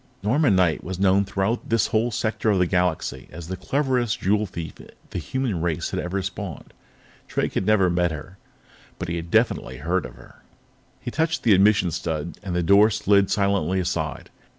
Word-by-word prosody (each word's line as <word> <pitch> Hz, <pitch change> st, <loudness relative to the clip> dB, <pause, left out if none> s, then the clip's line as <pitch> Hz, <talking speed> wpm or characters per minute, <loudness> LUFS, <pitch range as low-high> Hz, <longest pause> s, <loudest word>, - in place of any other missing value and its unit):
Norma 135 Hz, +8 st, +3 dB
Knight 90 Hz, -5 st, +2 dB
was 95 Hz, 0 st, -5 dB
known 95 Hz, 0 st, +4 dB
throughout 100 Hz, +4 st, -2 dB
this 115 Hz, -3 st, +3 dB
whole 115 Hz, +2 st, +2 dB
sector 110 Hz, 0 st, -1 dB
of 100 Hz, -, +3 dB
the 90 Hz, -, +3 dB
Galaxy 90 Hz, -2 st, -1 dB
as 85 Hz, +1 st, -9 dB
the 95 Hz, -, -2 dB
cleverest 125 Hz, +4 st, 0 dB
jewel 105 Hz, +2 st, +1 dB
thief 85 Hz, -3 st, -6 dB, 0.4 s
the -, -, -3 dB
human 115 Hz, -1 st, -2 dB
race 85 Hz, -3 st, -1 dB
had -, -, -2 dB
ever 95 Hz, +2 st, -2 dB
spawned. 95 Hz, -2 st, -6 dB, 0.5 s
Drake -, -, -1 dB
had 95 Hz, -, -1 dB
never 105 Hz, -4 st, +4 dB
met 90 Hz, 0 st, +1 dB
her, 80 Hz, +5 st, -8 dB, 0.6 s
but 90 Hz, -, -5 dB
he 85 Hz, -, -2 dB
had 85 Hz, 0 st, -6 dB
definitely 110 Hz, -, +1 dB
heard 85 Hz, +2 st, -1 dB
of 60 Hz, -, -15 dB
her. -, -, -17 dB, 0.6 s
He 120 Hz, -, -6 dB
touched 160 Hz, +3 st, 0 dB
the 110 Hz, -, +5 dB
admission 100 Hz, -2 st, +4 dB
stud, 80 Hz, 0 st, -4 dB
and 90 Hz, -3 st, -4 dB
the 90 Hz, -, +1 dB
door 100 Hz, +5 st, +6 dB
slid 100 Hz, -2 st, +2 dB
silently 100 Hz, -3 st, +1 dB
aside. 90 Hz, -, -3 dB
95 Hz, 185 wpm, -24 LUFS, 85-110 Hz, 0.6 s, door